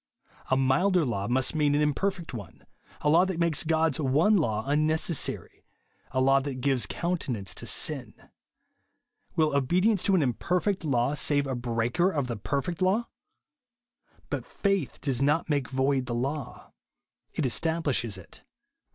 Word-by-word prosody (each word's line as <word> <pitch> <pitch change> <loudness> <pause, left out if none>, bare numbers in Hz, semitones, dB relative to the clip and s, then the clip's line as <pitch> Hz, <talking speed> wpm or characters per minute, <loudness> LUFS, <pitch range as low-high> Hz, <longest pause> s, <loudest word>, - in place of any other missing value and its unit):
A 130 - +3
milder 155 +7 +2
law 100 -5 -2
must 130 +1 +1
mean 150 -2 +2
an 150 - +2
im 150 -1 +2
perfect 185 -3 -3
one; 85 - -9 0.4
a - - -1
law 165 +4 +5
that 190 -2 -2
makes 170 -3 +1
God's 160 -2 +1
one 155 +9 +3
law 110 - 0
unnecessary; 155 +2 -1 0.5
a 130 - -1
law 135 +1 +4
that 135 -1 -4
gives 130 -1 +1
counte 170 -3 -3
nance 100 -6 -3
to - - -3
sin. - - +1 1.2
Will 155 -3 +2
obedience 180 - +2
to 195 - +2
an 180 - +3
ionper 150 +7 0
feet 200 -3 -1
law 135 -2 +1
save 145 -1 +2
a 135 - -3
breaker 120 +7 0
of 145 -8 -1
the 120 -2 -4
perfect 140 - -3
law? 200 +6 +1 1.2
But - - -3
faith 195 -8 -1
does 135 -3 -1
not 150 +3 +1
make 140 -3 0
void 130 -1 0
the 120 - -2
law; 135 +2 -4 0.6
it 150 - 0
establishes 135 - 0
it, 95 - -13
(Rom. - - -44
145 Hz, 160 wpm, -27 LUFS, 130-170 Hz, 1.2 s, law